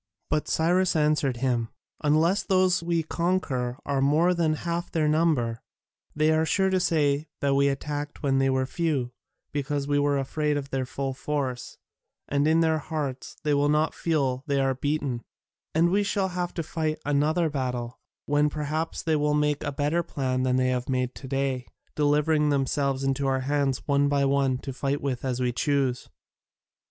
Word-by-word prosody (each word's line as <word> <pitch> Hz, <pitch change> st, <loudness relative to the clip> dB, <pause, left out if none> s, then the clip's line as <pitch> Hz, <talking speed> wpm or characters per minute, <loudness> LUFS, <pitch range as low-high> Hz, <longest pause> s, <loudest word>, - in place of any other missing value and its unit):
But 150 Hz, -, 0 dB
Cyrus 175 Hz, +3 st, +2 dB
answered 150 Hz, -4 st, +2 dB
him, 120 Hz, -3 st, 0 dB, 0.3 s
"Unless 160 Hz, +6 st, +3 dB
those 185 Hz, -3 st, +2 dB
we 170 Hz, -1 st, 0 dB
conquer 155 Hz, -8 st, -1 dB
are 140 Hz, -1 st, 0 dB
more 155 Hz, +6 st, +3 dB
than 165 Hz, -3 st, +1 dB
half 170 Hz, +1 st, -2 dB
their 155 Hz, -2 st, +1 dB
number, 150 Hz, -7 st, +1 dB, 0.5 s
they 155 Hz, +1 st, +3 dB
are 160 Hz, 0 st, +3 dB
sure 190 Hz, +4 st, +1 dB
to 185 Hz, -, +2 dB
say 155 Hz, -4 st, +1 dB
that 140 Hz, -1 st, +1 dB
we 140 Hz, +1 st, +3 dB
attacked 145 Hz, +2 st, -4 dB
when 135 Hz, -1 st, +2 dB
they 135 Hz, 0 st, +2 dB
were 130 Hz, 0 st, +1 dB
few, 140 Hz, -5 st, -1 dB, 0.4 s
because 145 Hz, 0 st, -2 dB
we 145 Hz, 0 st, +2 dB
were 145 Hz, 0 st, +2 dB
afraid 150 Hz, +2 st, -1 dB
of 140 Hz, -1 st, -5 dB
their 130 Hz, -1 st, -1 dB
full 135 Hz, 0 st, -3 dB
force, 135 Hz, -2 st, -3 dB, 0.5 s
and 145 Hz, +1 st, +1 dB
in 160 Hz, +1 st, +4 dB
their 160 Hz, -1 st, +2 dB
hearts 140 Hz, -4 st, -5 dB
they 150 Hz, -1 st, +2 dB
will 145 Hz, +1 st, +2 dB
not 150 Hz, +1 st, +2 dB
feel 140 Hz, -6 st, 0 dB
that 130 Hz, -, -16 dB
they -, -, +2 dB
are 135 Hz, -1 st, +2 dB
beaten; 140 Hz, -2 st, -2 dB, 0.5 s
and 170 Hz, +2 st, +4 dB
we 200 Hz, +2 st, +3 dB
shall 200 Hz, -1 st, 0 dB
have 180 Hz, -1 st, -3 dB
to 165 Hz, -, -2 dB
fight 155 Hz, 0 st, -2 dB
another 150 Hz, +4 st, +2 dB
battle, 125 Hz, -4 st, -3 dB, 0.3 s
when 145 Hz, +1 st, +2 dB
perhaps 155 Hz, +2 st, -3 dB
they 160 Hz, -1 st, +1 dB
will 150 Hz, 0 st, +1 dB
make 150 Hz, -1 st, +1 dB
a -, -, -2 dB
better 145 Hz, +4 st, 0 dB
plan 130 Hz, -6 st, -2 dB
than 130 Hz, 0 st, +1 dB
they 130 Hz, 0 st, +2 dB
have 125 Hz, 0 st, -2 dB
made 125 Hz, -1 st, 0 dB
to 135 Hz, -, -10 dB
day, 135 Hz, -1 st, -1 dB, 0.3 s
delivering 150 Hz, +1 st, +2 dB
themselves 135 Hz, -1 st, 0 dB
into 135 Hz, 0 st, 0 dB
our 130 Hz, -1 st, +1 dB
hands 140 Hz, -1 st, -1 dB
one 140 Hz, 0 st, +3 dB
by 140 Hz, -1 st, +2 dB
one, 135 Hz, -1 st, +2 dB
to 135 Hz, +1 st, -7 dB
fight 140 Hz, +2 st, -1 dB
with 130 Hz, -3 st, -3 dB
as 130 Hz, -2 st, -1 dB
we 125 Hz, -1 st, +1 dB
choose." 135 Hz, -1 st, 0 dB
145 Hz, 185 wpm, -26 LUFS, 135-155 Hz, 0.5 s, in